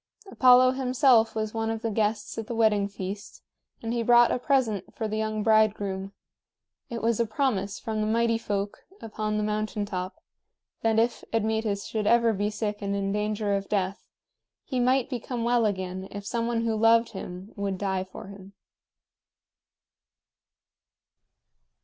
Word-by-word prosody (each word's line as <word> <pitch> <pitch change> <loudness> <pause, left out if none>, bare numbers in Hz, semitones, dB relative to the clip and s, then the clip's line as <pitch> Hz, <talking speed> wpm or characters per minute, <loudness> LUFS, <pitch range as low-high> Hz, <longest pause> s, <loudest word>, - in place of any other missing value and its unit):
Apollo 255 0 +6
himself 255 -3 +3
was 215 -1 -2
one 225 0 -1
of 225 0 -3
the 225 - -1
guests 210 0 -1
at 220 - -6
the 235 - -4
wedding 215 -3 +3
feast, 200 0 -7 0.4
and 225 +1 -2
he 240 - 0
brought 240 +1 +5
a - - 0
present 245 - 0
for 220 - -2
the 215 - -3
young 215 -1 -2
bridegroom; 205 -3 +2 0.8
it 230 -1 -5
was 230 -1 +1
a 235 - +3
promise 215 -4 -1
from 220 -1 -3
the 215 - 0
Mighty 230 +1 +2
Folk 205 -2 -3 0.2
upon 215 -1 -3
the 210 - 0
mountain 215 0 -2
top 185 +6 -5 0.6
that 225 -1 +2
if 230 +1 +1
Admetus 220 -2 -1
should 215 -2 -2
ever 235 -1 +4
be 205 +1 -1
sick 210 -1 -3
and 200 0 -2
in 195 0 -1
danger 210 0 -1
of 195 0 -4
death, 195 -1 -1 0.6
he 255 - -3
might 255 +1 +2
become 245 -2 -4
well 235 -1 +3
again 190 -1 -4
if 205 0 -8
some 230 +2 -1
one 235 -1 0
who 225 -1 0
loved 230 +1 +4
him 190 0 -8
would 200 -2 -2
die 190 -1 -1
for 190 - -10
him. 200 0 -12
215 Hz, 160 wpm, -27 LUFS, 200-230 Hz, 0.8 s, Apollo